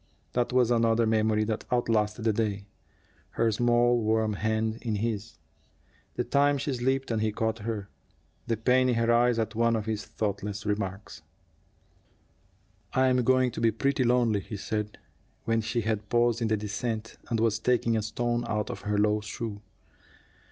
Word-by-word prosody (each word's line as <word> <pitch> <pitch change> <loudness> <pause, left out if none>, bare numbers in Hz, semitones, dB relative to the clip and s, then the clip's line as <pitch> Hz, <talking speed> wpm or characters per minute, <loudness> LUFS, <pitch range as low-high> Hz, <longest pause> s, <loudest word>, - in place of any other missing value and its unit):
That 120 -1 0
was 125 -1 +3
another 115 -1 +3
memory 110 -1 +2
that 110 0 -3
outlasted 110 -2 +1
the 110 - +3
day 105 -2 -1 0.7
her 115 -1 +3
small 120 +1 +3
warm 110 0 +1
hand 110 +2 -1
in 115 -3 -2
his; 110 0 -3 0.8
the - - 0
time 145 0 +2
she 140 +1 -2
slipped 130 +1 -1
and 110 -1 0
he 110 0 +1
caught 110 +2 -2
her; 105 -2 -4 0.6
the 115 - 0
pain 130 +3 +3
in 125 - +2
her 115 0 +2
eyes 120 0 +3
at 110 -1 -1
one 115 +1 +2
of 110 -2 -2
his 110 -2 -2
thoughtless 100 -1 -4
remarks. 100 -1 -3 1.7
"I'm 130 -1 +3
going 130 0 +3
to - - -6
be 115 - +4
pretty 135 +4 0
lonely," 120 -3 +2
he 105 +2 -7
said, 105 +1 -3 0.5
when 115 0 +1
she 120 +2 -1
had 110 -1 -2
paused 120 0 +2
in 115 - +1
the 110 0 +1
descent 110 +2 -4
and 115 -1 0
was 110 -1 +1
taking 120 -1 +1
a 110 - +1
stone 120 +2 -1
out 105 -1 -2
of - - -7
her 105 0 -1
low 105 +1 +2
shoe. 105 0 -6
115 Hz, 170 wpm, -28 LUFS, 105-120 Hz, 1.7 s, be